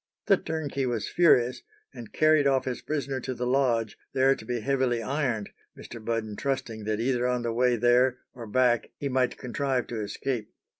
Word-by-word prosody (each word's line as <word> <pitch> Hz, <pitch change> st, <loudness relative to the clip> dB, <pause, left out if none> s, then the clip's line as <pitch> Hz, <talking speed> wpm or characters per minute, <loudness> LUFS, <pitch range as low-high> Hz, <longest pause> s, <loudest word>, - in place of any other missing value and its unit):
The 195 Hz, -, +5 dB
turnkey 145 Hz, -5 st, -3 dB
was 115 Hz, -4 st, -2 dB
furious, 125 Hz, -8 st, +3 dB, 0.3 s
and 120 Hz, -4 st, -10 dB
carried 155 Hz, -2 st, +4 dB
off 135 Hz, -1 st, +2 dB
his 130 Hz, -2 st, -3 dB
prisoner 140 Hz, -3 st, -2 dB
to 130 Hz, +1 st, -4 dB
the 125 Hz, -, -3 dB
lodge, 120 Hz, -4 st, +1 dB
there 135 Hz, +1 st, +4 dB
to -, -, -9 dB
be 120 Hz, +1 st, -3 dB
heavily 130 Hz, -2 st, 0 dB
ironed, 125 Hz, -5 st, -1 dB, 0.3 s
Mr. 115 Hz, -, -10 dB
Budden 110 Hz, -2 st, -2 dB
trusting 115 Hz, -4 st, -3 dB
that 110 Hz, 0 st, -1 dB
either 125 Hz, +1 st, +1 dB
on 125 Hz, -1 st, 0 dB
the 115 Hz, -1 st, -1 dB
way 125 Hz, +1 st, +3 dB
there 120 Hz, +2 st, +3 dB, 0.2 s
or 120 Hz, -2 st, -9 dB
back 120 Hz, +1 st, +2 dB
he 140 Hz, -, -3 dB
might 130 Hz, -1 st, +1 dB
contrive 130 Hz, 0 st, -1 dB
to 115 Hz, -2 st, -3 dB
escape. 110 Hz, +2 st, -3 dB
125 Hz, 185 wpm, -27 LUFS, 115-135 Hz, 0.3 s, The